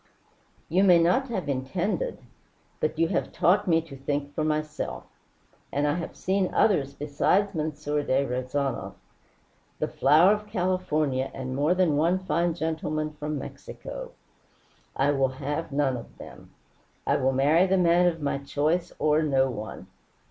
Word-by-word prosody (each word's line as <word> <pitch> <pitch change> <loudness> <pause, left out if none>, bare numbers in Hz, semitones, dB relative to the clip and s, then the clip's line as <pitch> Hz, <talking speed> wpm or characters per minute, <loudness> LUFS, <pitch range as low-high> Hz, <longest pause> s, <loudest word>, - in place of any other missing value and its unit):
"You 185 +4 +2
may 180 -3 +7
not 180 +11 +3
have 205 - -3
intended 170 - -2 0.6
but 155 - -1
you 165 0 +2
have - - -1
taught 190 +4 +2
me 165 -2 +4
to 155 -4 -11
think 140 +1 -3
for 155 - -1
myself. 155 0 -2 0.7
And 145 +1 0
I 145 - +2
have 170 0 -5
seen 190 0 0
others 140 -10 +2
besides 180 +7 +1
M. 155 0 0
de 145 -2 -1
Rezanov 130 +1 -2 0.8
the - - -1
flower 170 +7 +5
of 210 0 -4
California 175 - 0
and 130 -1 -4
more 150 +6 +2
than 175 -6 +2
one 170 +5 +3
fine 175 -2 0
gentleman 155 -2 -2
from 150 0 -4
Mexico. - - -8 0.8
I 140 +2 +2
will 135 -2 +2
have 150 +3 -3
none 140 -2 +1
of 120 - -10
them. - - -12 0.6
I - - +2
will 130 +1 +2
marry 150 +7 +4
the 190 +1 +2
man 175 0 +4
of 165 -3 -1
my 140 -1 0
choice 155 +5 -1
or 155 0 +2
no 135 -3 +2
one. 110 -2 -7
155 Hz, 155 wpm, -26 LUFS, 140-180 Hz, 0.8 s, may